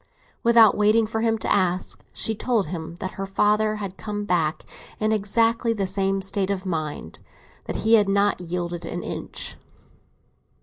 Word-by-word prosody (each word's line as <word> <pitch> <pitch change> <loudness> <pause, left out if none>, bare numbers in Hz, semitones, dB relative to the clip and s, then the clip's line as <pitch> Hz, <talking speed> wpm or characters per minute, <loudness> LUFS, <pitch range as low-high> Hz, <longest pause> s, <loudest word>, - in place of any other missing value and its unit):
Without 230 -2 +6
waiting 215 +2 +4
for 220 +1 -3
him 225 -1 +2
to - - 0
ask, 185 -2 0
she 220 - -1
told 220 -1 0
him 165 0 -6
that 185 +2 -5
her - - -1
father 210 +2 +2
had 200 -3 -6
come 205 -1 -4
back 165 -4 0 0.3
in 215 0 +1
exactly 225 +2 +1
the 200 -3 -1
same 195 0 0
state 195 0 -1
of 195 -1 -2
mind—that 155 - -6
he 220 +1 +1
had 210 -3 +5
not 200 -1 +2
yielded 175 0 -4
an 170 +1 -5
inch. - - -5
200 Hz, 160 wpm, -24 LUFS, 180-215 Hz, 0.3 s, Without